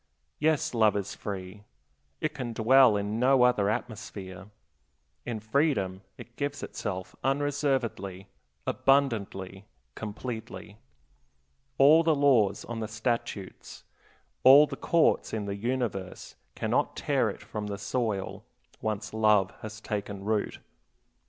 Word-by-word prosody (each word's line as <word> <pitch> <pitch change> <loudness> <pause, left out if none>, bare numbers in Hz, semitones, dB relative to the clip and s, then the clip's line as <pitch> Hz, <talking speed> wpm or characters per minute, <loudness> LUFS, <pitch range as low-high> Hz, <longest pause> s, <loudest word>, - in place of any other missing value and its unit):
Yes, 155 -3 +1
love 110 -3 +3
is 100 -1 -4
free; 100 0 -7 0.6
it 155 0 -1
can 125 -5 -5
dwell 115 0 +5
in 105 +2 -2
no 130 0 +4
other 120 -5 +3
atmosphere. 100 -4 -5 0.8
In 115 -2 -3
freedom 110 - 0 0.2
it 120 - -12
gives 145 0 -3
itself 95 -3 -5
unreservedly, 135 -9 -1 0.4
abundantly, 105 -8 0 0.3
completely. 110 -1 -7 1.0
All 150 +4 +7
the 160 -2 +3
laws 130 -9 +3
on 115 -1 -5
the 110 - -3
statutes, 110 -3 -4 0.6
all 140 +3 +9
the 140 -2 -6
courts 165 +3 +2
in 110 -2 -2
the 100 0 -3
universe, 110 -4 -3 0.2
cannot - - 0
tear - - +1
it - - -8
from 105 -1 -5
the 100 -1 -4
soil, 105 -1 -3 0.4
once 110 0 -3
love 105 -3 +3
has 110 0 -7
taken 100 -2 -5
root. 110 -1 -1
110 Hz, 120 wpm, -28 LUFS, 100-130 Hz, 1.0 s, all